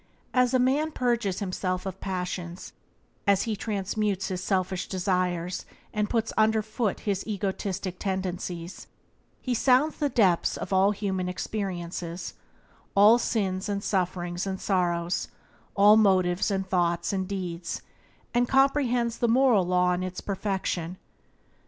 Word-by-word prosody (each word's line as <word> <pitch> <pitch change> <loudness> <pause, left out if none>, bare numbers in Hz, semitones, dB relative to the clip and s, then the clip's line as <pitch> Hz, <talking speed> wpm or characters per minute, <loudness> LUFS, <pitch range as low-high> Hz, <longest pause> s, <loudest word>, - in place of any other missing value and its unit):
As 250 -1 +3
a - - +6
man 270 +5 +2
purges 235 -8 0
himself 185 -1 -2
of 190 0 -6
passions, 180 -2 -4 0.5
as 200 -1 +4
he 225 -3 -2
transmutes 200 -1 -2
his 185 -1 -3
selfish 185 -1 -1
desires 180 -2 -1 0.3
and 210 -1 0
puts 225 -2 0
under 220 0 +3
foot 220 -1 -2
his 200 -2 -1
egotistic 195 -3 -3
tendencies, 180 -2 -4 0.6
he 255 - 0
sounds 260 +5 +3
the 290 -2 0
depths 195 -9 +2
of - - -4
all 190 +1 +5
human 190 -3 -2
experiences 180 -3 -4 0.3
— - - -33
all 210 +4 +7
sins 195 -4 -1
and 200 0 -2
sufferings 180 -1 -1
and 190 -1 -3
sorrows, 175 -2 0 0.5
all 210 +2 +7
motives 185 -4 +3
and 195 -1 -1
thoughts 175 -1 +1
and 190 -1 -1
deeds 180 -3 -4 0.2
— - - -34
and 240 0 +2
comprehends 255 -4 +2
the 235 - +2
moral 235 -6 +4
law 180 0 +3
in 180 - -2
its 185 0 -4
perfection. 190 -3 -2
195 Hz, 140 wpm, -27 LUFS, 180-220 Hz, 0.6 s, all